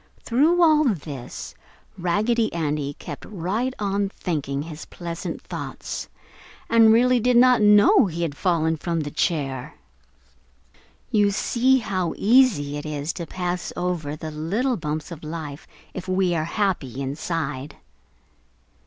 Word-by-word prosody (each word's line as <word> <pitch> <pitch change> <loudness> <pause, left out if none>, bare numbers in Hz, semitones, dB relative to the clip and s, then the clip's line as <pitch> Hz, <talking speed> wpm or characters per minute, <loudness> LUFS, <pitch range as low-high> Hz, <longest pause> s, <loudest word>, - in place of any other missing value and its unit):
Through 315 +9 +3
all 310 -2 +5
this 145 - -4 0.4
Raggedy 215 +6 +1
Andy 150 -3 -2
kept - - -8
right 210 +6 -2
on 200 -1 -1
thinking 145 -7 -3
his 160 -1 -8
pleasant 170 -1 -6
thoughts, - - -6 0.6
and 225 -1 +6
really 250 +2 +4
did 245 +1 +3
not 250 -1 +6
know 210 - +6
he 170 -1 -3
had 150 -4 -2
fallen 160 -1 +1
from 165 +1 -2
the 145 -1 -5
chair. 140 -5 -2 1.4
You 205 -2 +4
see 250 +6 +2
how 190 -7 -2
easy 205 - +3
it 145 - -6
is 150 +1 -3
to 170 -2 -6
pass 180 -1 -3
over 175 -5 -2
the 155 0 -7
little 200 - -1
bumps 155 -2 -4
of 160 -2 -8
life 155 -2 -6 0.3
if 185 - -7
we 185 -1 +1
are 155 -2 0
happy 170 - -1
inside. 140 0 -3
175 Hz, 135 wpm, -23 LUFS, 155-215 Hz, 1.4 s, and